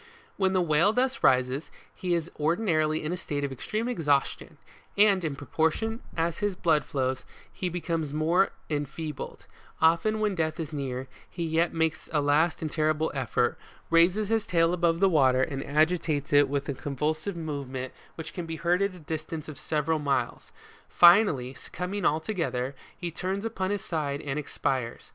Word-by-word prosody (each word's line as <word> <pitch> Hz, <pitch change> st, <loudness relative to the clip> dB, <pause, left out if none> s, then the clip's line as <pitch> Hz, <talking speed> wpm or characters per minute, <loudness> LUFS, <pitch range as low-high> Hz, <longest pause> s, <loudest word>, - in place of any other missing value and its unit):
When 190 Hz, -1 st, +1 dB
the 185 Hz, -1 st, +3 dB
whale 165 Hz, +5 st, +4 dB
thus 255 Hz, +2 st, 0 dB
rises, 130 Hz, +4 st, +2 dB, 0.2 s
he 180 Hz, -2 st, -1 dB
is 170 Hz, 0 st, -3 dB
ordinarily 155 Hz, -2 st, +1 dB
in 155 Hz, +3 st, -2 dB
a -, -, 0 dB
state 145 Hz, -4 st, -3 dB
of 140 Hz, -, -2 dB
extreme 215 Hz, -, -3 dB
exhaustion, 145 Hz, -, 0 dB, 0.4 s
and, 200 Hz, -3 st, +5 dB
in 155 Hz, -4 st, -2 dB
proportion 160 Hz, -, -1 dB, 0.2 s
as 165 Hz, 0 st, 0 dB
his 205 Hz, -2 st, 0 dB
blood 160 Hz, -5 st, +2 dB
flows, 130 Hz, -1 st, -1 dB, 0.3 s
he 185 Hz, -3 st, -2 dB
becomes 165 Hz, -3 st, -2 dB
more 165 Hz, +6 st, +2 dB, 0.2 s
enfeebled; 150 Hz, 0 st, -5 dB, 0.3 s
often 170 Hz, +7 st, +3 dB
when 210 Hz, -2 st, +1 dB
death 160 Hz, -3 st, -1 dB
is 160 Hz, -1 st, -4 dB
near, 130 Hz, -2 st, -3 dB, 0.2 s
he 175 Hz, -, -4 dB
yet 165 Hz, +1 st, +1 dB
makes 160 Hz, -1 st, -1 dB
a 155 Hz, -, +2 dB
last 150 Hz, +3 st, +2 dB
and 155 Hz, -, -3 dB
terrible 155 Hz, 0 st, +1 dB
effort, 125 Hz, -2 st, 0 dB, 0.3 s
raises 180 Hz, +5 st, +4 dB
his 225 Hz, 0 st, +1 dB
tail 170 Hz, -4 st, +3 dB
above 170 Hz, -1 st, +1 dB
the 195 Hz, -, +6 dB
water, 130 Hz, -7 st, +4 dB
and 135 Hz, -1 st, -3 dB
agitates 155 Hz, -1 st, +1 dB
it 145 Hz, -1 st, +6 dB
with 140 Hz, 0 st, -2 dB
a 140 Hz, -, -1 dB
convulsive 155 Hz, +7 st, -2 dB
movement 140 Hz, -5 st, -5 dB, 0.2 s
which 160 Hz, -, -7 dB
can 175 Hz, -2 st, -5 dB
be 165 Hz, -, -4 dB
heard 175 Hz, +3 st, +1 dB
at 200 Hz, -1 st, 0 dB
a -, -, -12 dB
distance 155 Hz, 0 st, -5 dB
of 155 Hz, -3 st, -8 dB
several 155 Hz, +1 st, 0 dB
miles. 135 Hz, -5 st, -1 dB, 0.4 s
Finally, 170 Hz, -, +5 dB
succumbing 185 Hz, +8 st, -5 dB
altogether, 155 Hz, -5 st, 0 dB, 0.2 s
he 175 Hz, -2 st, -4 dB
turns 190 Hz, +5 st, -3 dB
upon 190 Hz, -4 st, -2 dB
his 205 Hz, -1 st, -2 dB
side 145 Hz, -4 st, -2 dB
and 145 Hz, -1 st, -3 dB
ex 150 Hz, -, -9 dB
pires. 125 Hz, -3 st, -2 dB
160 Hz, 170 wpm, -28 LUFS, 145-180 Hz, 0.4 s, the